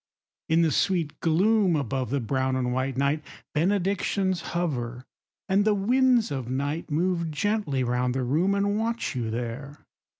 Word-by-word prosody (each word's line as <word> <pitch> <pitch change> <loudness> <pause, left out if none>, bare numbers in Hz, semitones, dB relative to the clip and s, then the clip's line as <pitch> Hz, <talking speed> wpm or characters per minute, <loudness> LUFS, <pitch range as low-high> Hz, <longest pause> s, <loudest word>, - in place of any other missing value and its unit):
In 165 +1 +4
the 160 - +2
sweet 170 -1 0
gloom 190 +3 +3
above 135 -3 -2
the 140 +2 0
brown 130 +2 -1
and 125 -1 -1
white 130 +1 -1
Night 140 +3 +1 0.3
benedictions 190 +2 0 0.2
hover; 125 -7 -2 0.4
and 195 +1 +3
the 210 0 +3
winds 245 - +3
of 130 -4 -4
night 145 +6 -2
Move 170 +2 0
gently 155 -4 0
round 125 +1 0
the 130 - 0
room, 165 +10 +1
and 205 +1 +1
watch 230 -3 -2
you 120 -3 -2
there. 125 +6 -5
155 Hz, 155 wpm, -26 LUFS, 130-195 Hz, 0.4 s, In